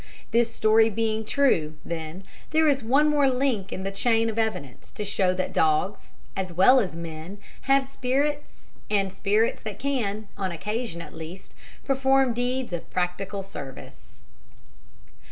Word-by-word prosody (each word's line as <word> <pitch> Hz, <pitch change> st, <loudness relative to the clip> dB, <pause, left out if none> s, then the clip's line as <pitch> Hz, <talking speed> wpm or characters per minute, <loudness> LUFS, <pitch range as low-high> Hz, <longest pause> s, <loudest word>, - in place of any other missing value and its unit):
This 230 Hz, 0 st, +3 dB
story 220 Hz, 0 st, +4 dB
being 220 Hz, 0 st, -1 dB
true, 210 Hz, -, +2 dB
then, 165 Hz, +2 st, -5 dB, 0.3 s
there 315 Hz, 0 st, +3 dB
is 275 Hz, -2 st, +3 dB
one 270 Hz, +7 st, +3 dB
more 290 Hz, -2 st, +4 dB
link 250 Hz, -7 st, 0 dB
in 190 Hz, -, -4 dB
the 195 Hz, -, -2 dB
chain 225 Hz, +2 st, +2 dB
of 225 Hz, -, -3 dB
evidence 185 Hz, -, -3 dB
to 210 Hz, -, -5 dB
show 190 Hz, -2 st, +2 dB
that 185 Hz, -, -2 dB
dogs, 160 Hz, +6 st, +1 dB, 0.2 s
as 185 Hz, -2 st, -3 dB
well 195 Hz, +10 st, +6 dB
as 190 Hz, -8 st, -2 dB
men, 165 Hz, +3 st, -7 dB, 0.3 s
have 275 Hz, 0 st, +5 dB
spirits, 280 Hz, +3 st, -2 dB, 0.2 s
and 195 Hz, -2 st, +1 dB
spirits 210 Hz, +4 st, +1 dB
that 215 Hz, -3 st, -6 dB
can, 220 Hz, -7 st, -2 dB
on 190 Hz, -2 st, -2 dB
occasion, 210 Hz, 0 st, -4 dB
at -, -, -12 dB
least, 160 Hz, +4 st, -9 dB, 0.3 s
perform 270 Hz, -1 st, +3 dB
deeds 245 Hz, -2 st, -2 dB
of 170 Hz, -, -5 dB
practical 190 Hz, +2 st, -2 dB
service. 145 Hz, -9 st, -10 dB
215 Hz, 150 wpm, -26 LUFS, 185-255 Hz, 0.3 s, well